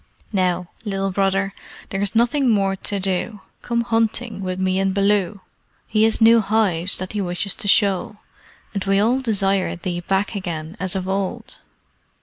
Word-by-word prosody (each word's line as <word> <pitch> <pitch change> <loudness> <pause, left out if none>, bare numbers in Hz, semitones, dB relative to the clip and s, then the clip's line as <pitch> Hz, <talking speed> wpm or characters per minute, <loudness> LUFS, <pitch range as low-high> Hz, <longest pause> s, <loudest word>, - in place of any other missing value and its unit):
Now, 180 -2 +1 0.2
Little 195 -2 -2
Brother, 195 0 0 0.4
there 195 - -2
is 205 +1 -1
nothing 245 +4 +3
more 195 -3 +2
to 200 +1 -2
do. 195 +2 -2 0.2
Come 235 -1 0
hunting 225 -2 0
with 185 -1 -3
me 190 0 +1
and 195 0 0
Baloo. 200 -1 +1 0.5
He 215 0 +3
has 225 - +2
new 230 +1 +7
hives 200 -4 +1
that 185 +2 -4
he 210 - -1
wishes 180 +2 -2
to 215 - -5
show, 200 -1 +3 0.6
and 200 -2 -2
we 195 0 +3
all 235 +5 +3
desire 200 -6 +1
thee 175 0 -4
back 195 +4 -1
again 170 -4 -5
as 185 -1 -2
of 185 -1 -2
old. 195 0 -3
195 Hz, 165 wpm, -21 LUFS, 190-215 Hz, 0.6 s, new